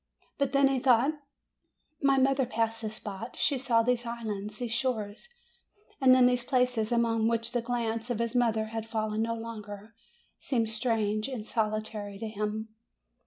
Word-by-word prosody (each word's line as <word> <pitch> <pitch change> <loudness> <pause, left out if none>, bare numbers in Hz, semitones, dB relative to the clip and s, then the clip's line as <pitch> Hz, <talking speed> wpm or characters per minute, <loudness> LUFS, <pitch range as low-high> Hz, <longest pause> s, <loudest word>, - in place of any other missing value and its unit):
But 280 -1 +1
then 275 0 +5
he 270 -1 +1
thought, 255 +1 +4 0.9
"My 275 -1 +4
mother 265 -1 +3
passed 225 -1 -1
this 215 -1 -4
spot; 210 +2 -7
she 280 -3 +1
saw 235 -3 +3
these 245 0 +1
islands, 215 -3 -5
these 240 -1 -4
shores"; 230 - -2 0.7
and 255 -1 +7
then 255 -1 +6
these 250 -1 +3
places 250 -3 +1
upon 230 -1 +2
which 230 0 0
the 245 - 0
glance 230 -1 -2
of 240 - 0
his 230 0 -1
mother 225 -3 +1
had 225 0 -4
fallen 215 -1 -1
no 230 0 0
longer 215 -2 -8 0.5
seemed 230 -5 0
strange 220 -1 0
and 250 -6 -5
solitary 215 -2 -2
to 225 +2 -4
him. 215 +1 -3
230 Hz, 165 wpm, -29 LUFS, 215-245 Hz, 0.9 s, and